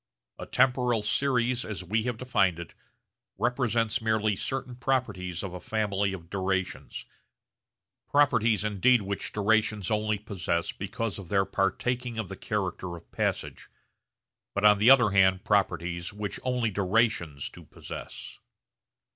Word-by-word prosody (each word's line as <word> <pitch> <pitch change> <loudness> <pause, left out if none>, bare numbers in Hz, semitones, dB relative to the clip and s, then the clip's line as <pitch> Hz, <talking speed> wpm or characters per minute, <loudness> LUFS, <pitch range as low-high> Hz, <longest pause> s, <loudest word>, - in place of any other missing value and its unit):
A - - -7
temporal 125 -4 +2
series, 125 +1 +1
as 100 -3 -5
we 105 +5 0
have 120 -2 -2
defined 100 -8 +1
it, 85 -3 -8 0.6
represents 115 -3 0
merely 110 -2 +1
certain 130 +4 -4
properties 105 -10 -2
of 95 -2 -5
a 90 - -6
family 100 -1 -1
of 85 -4 -8
durations 95 0 -3 1.0
properties 115 -7 +3
indeed 105 +3 +3
which 100 0 -4
durations 105 -1 +1
only 105 0 +1
possess 95 -5 -2
because 100 +1 -4
of 90 -4 -10
their 95 -1 +2
partaking 120 +6 -1
of 110 -5 -3
the - - -6
character 90 -2 -3
of 85 - -17
passage, - - -3 0.9
but 100 +1 +1
on 105 -1 +7
the 110 +4 +6
other 125 -6 +7
hand 95 -1 +4
properties 90 -4 0
which 105 -1 -5
only 125 -3 0
durations 95 - 0
do - - -13
possess. - - -9
105 Hz, 135 wpm, -28 LUFS, 95-120 Hz, 1.0 s, on